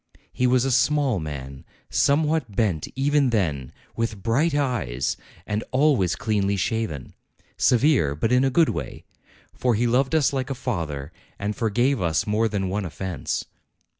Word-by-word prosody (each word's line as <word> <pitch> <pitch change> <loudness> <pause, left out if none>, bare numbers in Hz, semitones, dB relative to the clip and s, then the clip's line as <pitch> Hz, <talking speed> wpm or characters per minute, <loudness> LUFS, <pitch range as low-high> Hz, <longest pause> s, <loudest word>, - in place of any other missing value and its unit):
He 125 - +1
was 125 0 +3
a 135 - 0
small 135 -3 +2
man, 70 -4 -7 0.3
somewhat 150 -6 +1
bent 95 -9 0
even 140 0 +2
then, 75 - -1 0.2
with 110 -4 -3
bright 140 +8 +2
eyes, 105 - -1 0.3
and 105 +1 -2
al 145 +3 +4
ways 95 -5 0
cleanly 100 -2 0
shaven. 100 - -2 0.4
Severe, 125 - +3
but 110 +10 -1
in 125 +1 +4
a 135 - +3
good 165 +4 +3
way; - - -5 0.5
for 125 -2 +1
he 120 +3 +1
loved 130 +5 +2
us 145 -4 +3
like 135 0 -2
a 135 - -2
father, 80 - -4 0.3
and 105 +1 -3
forgave 120 +3 +1
us 80 -3 +1
more 110 +2 +1
than 100 -3 -2
one 100 +3 -2
offence. 90 -2 -4
115 Hz, 160 wpm, -24 LUFS, 95-135 Hz, 0.5 s, al